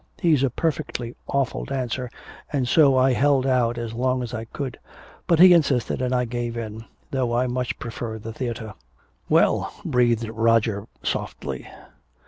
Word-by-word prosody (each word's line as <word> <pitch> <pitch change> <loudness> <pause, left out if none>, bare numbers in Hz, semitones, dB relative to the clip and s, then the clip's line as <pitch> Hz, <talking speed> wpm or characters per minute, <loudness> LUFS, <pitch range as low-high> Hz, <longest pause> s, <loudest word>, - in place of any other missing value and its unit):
He's 155 -6 +3
a 135 - +2
perfectly 125 -4 -2
awful 140 -2 -1
dancer, 125 -2 -3 0.4
and 135 -4 0
so 140 -2 +5
I 130 0 +4
held 135 0 +3
out 120 -3 +2
as 115 -1 -4
long 130 +1 0
as 120 0 -6
I 110 -1 -4
could. 130 +2 -6 0.5
But 170 - +4
he 180 +2 +9
insisted 140 -8 +2
and 125 -1 0
I 125 -1 +1
gave 120 0 -3
in, 110 -1 -6 0.3
though 125 -3 0
I 125 - +2
much 125 0 -2
prefer 115 -1 -5
the 110 +1 -7
theater." 115 -3 -4 0.6
"Well!" - - +3
breathed 120 -2 +2
Roger 115 -2 +1 0.2
softly. 65 -2 -4
125 Hz, 155 wpm, -24 LUFS, 115-130 Hz, 0.6 s, he